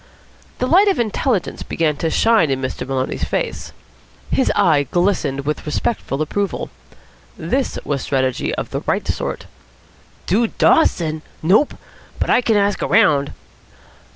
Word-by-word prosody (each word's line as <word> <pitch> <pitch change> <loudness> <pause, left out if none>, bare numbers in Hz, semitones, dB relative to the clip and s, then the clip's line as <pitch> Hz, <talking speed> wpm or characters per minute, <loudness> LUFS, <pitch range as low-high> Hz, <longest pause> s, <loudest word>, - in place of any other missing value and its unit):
The - - -1
light 370 +10 +5
of 390 - +2
intelligence 230 -2 -1
began 155 -3 -1
to 165 - -1
shine 220 -3 +3
in 135 -1 0
Master 130 -1 -4
Maloney's 135 -1 -2
face. - - -3 0.6
His 265 - +2
eye 160 -8 +3
glistened 175 -7 0
with 150 +1 -2
respectful 150 -2 -2
approval. 200 +5 -3 0.7
This 265 0 -1
was 140 -2 -1
strategy 130 -2 -1
of - - -5
the - - -3
right - - 0
sort. - - -3 0.8
"Dude 220 +5 0
Dawson? 160 - +3 0.2
Nope. 205 - +3 0.4
But - - 0
I - - +4
can 225 -3 +2
ask 200 0 +1
around." 150 -11 +3
175 Hz, 135 wpm, -19 LUFS, 140-225 Hz, 0.8 s, light